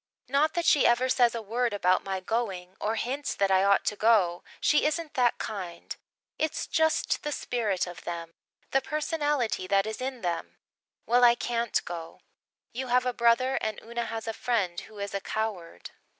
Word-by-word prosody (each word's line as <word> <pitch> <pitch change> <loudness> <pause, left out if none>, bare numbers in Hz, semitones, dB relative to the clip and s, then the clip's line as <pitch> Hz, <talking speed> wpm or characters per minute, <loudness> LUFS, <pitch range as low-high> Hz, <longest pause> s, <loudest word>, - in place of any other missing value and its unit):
Not 285 +5 +2
that 345 -1 0
she 290 - +5
ever 240 +2 +3
says 245 -2 +3
a 230 - -4
word 235 +2 -1
about 185 -2 +2
my 190 -1 -3
going 190 -3 -3
or 220 +2 0
hints 270 +6 -2
that 195 -1 +1
I 190 0 +4
ought 200 0 +3
to 210 - 0
go 205 -6 +3 0.2
she 300 - +3
isn't 310 0 -3
that 245 -2 +2
kind. 185 -5 -6 0.4
It's 315 - -1
just 320 -1 +1
the 295 - -3
spirit 220 -9 -1
of 175 -1 -9
them 170 -1 -5 0.4
the 270 - +3
personality 295 - -1
that 195 +1 +3
is 220 +2 -5
in 260 -1 -4
them. 175 -2 -3 0.5
Well, 245 +2 +3
I 240 -1 +7
can't 235 -1 0
go. 165 -1 -7 0.5
You 260 +2 -4
have 250 +1 +3
a 250 - 0
brother 240 +3 +3
and 220 -1 -2
Una 235 +1 -3
has 225 0 -5
a 225 - -1
friend 205 -8 -1
who 215 -1 -13
is 200 -1 -5
a 200 - -2
coward." 210 -7 -4
230 Hz, 185 wpm, -28 LUFS, 195-255 Hz, 0.5 s, I